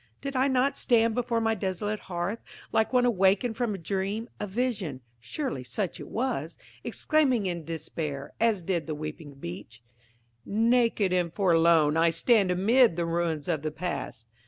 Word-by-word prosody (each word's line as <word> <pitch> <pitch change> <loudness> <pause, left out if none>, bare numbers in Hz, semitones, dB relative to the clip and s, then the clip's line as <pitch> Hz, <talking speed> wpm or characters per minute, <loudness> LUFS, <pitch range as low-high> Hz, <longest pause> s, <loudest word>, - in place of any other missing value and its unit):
Did 275 -1 -5
I 260 +1 +3
not 270 +1 +1
stand 230 -2 +3
before 235 0 0
my 225 0 +1
desolate 205 +1 -2
hearth, 185 +5 -3 0.3
like 220 - +2
one 250 -1 +3
awakened 205 +1 +2
from 230 -3 -1
a - - -5
dream, 195 +6 -3
a 210 - -3
vision–(surely 190 - -4
such 170 - -3
it - - -8
was!)–exclaiming 250 - -1
in 175 -3 -3
despair, 155 -3 -5
as 220 -5 +2
did 170 -2 -1
the 155 - -3
weeping 150 -1 -7
Beech, 110 0 -9 0.6
"Naked 225 - +2
and 175 -2 +1
forlorn 165 -4 +4
I 165 +1 +4
stand 195 +4 +3
amid 215 +4 +4
the 170 0 -1
ruins 165 -3 -1
of 160 -5 0
the 155 - -2
past." 150 -7 -5
190 Hz, 155 wpm, -27 LUFS, 160-230 Hz, 0.6 s, forlorn